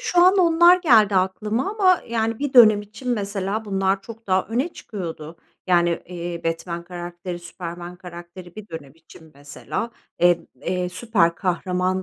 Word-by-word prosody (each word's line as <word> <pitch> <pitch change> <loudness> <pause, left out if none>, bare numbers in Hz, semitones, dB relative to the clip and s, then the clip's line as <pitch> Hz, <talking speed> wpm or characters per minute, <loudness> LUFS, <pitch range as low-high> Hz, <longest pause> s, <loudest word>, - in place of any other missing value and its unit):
şu 355 - -1
an 380 +2 +5
onlar 345 +1 +6
geldi 220 - +5
aklıma 210 - 0
ama 380 -4 +3
yani 225 -1 -1
bir 285 -1 -3
dönem 215 -4 +7
için 225 +5 -10
mesela 200 -1 -2
bunlar 195 -1 0
çok 225 -1 -12
daha 185 0 +1
öne 250 +9 -1
çıkıyordu. 165 -6 -7 0.3
Yani, 175 -2 +2
iii, 175 -1 -6
Batman 170 +1 -3
karakteri, 175 0 -7
Superman 175 0 -8
karakteri 175 0 -11
bir 215 0 -9
dönem 145 -5 -9
için 160 0 -17
mesela, 145 +11 -6 0.3
emm, 175 -1 +3 0.2
eee, 180 -1 -2
süper 180 -3 +1
kahraman 185 0 -1
185 Hz, 150 wpm, -22 LUFS, 175-225 Hz, 0.3 s, dönem